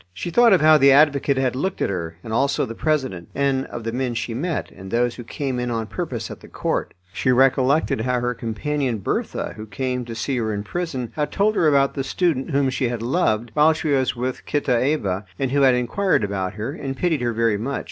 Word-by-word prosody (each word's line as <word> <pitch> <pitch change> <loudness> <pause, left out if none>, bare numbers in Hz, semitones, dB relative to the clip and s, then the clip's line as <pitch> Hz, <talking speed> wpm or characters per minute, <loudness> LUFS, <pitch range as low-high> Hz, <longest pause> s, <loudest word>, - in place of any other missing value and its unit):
She 170 - -4
thought 240 +4 +5
of 185 -5 +5
how 155 0 +6
the 140 0 +6
advocate 140 -1 +4
had 130 -2 +1
looked 185 +8 -2
at - - 0
her, 85 -3 -4
and 110 - -6
also 140 +4 +1
the 115 - -6
president, 130 - -1
and 135 -1 0
of 120 - -7
the 115 - -2
men 125 0 -2
she 115 0 -3
met, 160 +7 -3
and 95 0 -11
those 120 +2 +1
who 120 - -9
came 130 +1 -3
in 125 0 -2
on 115 -1 -2
purpose 120 -4 -5
at - - -8
the - - -14
court. - - -3 0.2
She 130 - +1
recollected 130 +1 +3
how 125 +1 0
her 125 0 -1
companion, 120 +3 -2
Bertha, 95 - -3
who 110 0 -8
came 125 +4 -2
to 115 -1 -7
see 125 +3 -2
her 110 -2 -1
in 100 - -4
prison, 130 -2 -4
had 150 -1 -1
told 210 +2 +1
her 165 - +3
about 140 -2 +3
the 135 - -2
student 145 -1 0
whom 135 -1 +1
she 130 -1 0
had 120 -2 -4
"loved" 120 -5 0
while 155 +4 +5
she 155 0 -3
was 135 -3 +1
with 125 +1 -3
Kitaeva, 125 -8 0
and 135 -2 -1
who 140 +1 +2
had 130 -2 +5
inquired 125 - +1
about 95 -2 -2
her, 110 +5 -4
and 135 -4 -5
pitied 165 -5 0
her 120 -1 0
very 115 -2 +1
much. 135 +4 -2
130 Hz, 230 wpm, -22 LUFS, 115-145 Hz, 0.2 s, how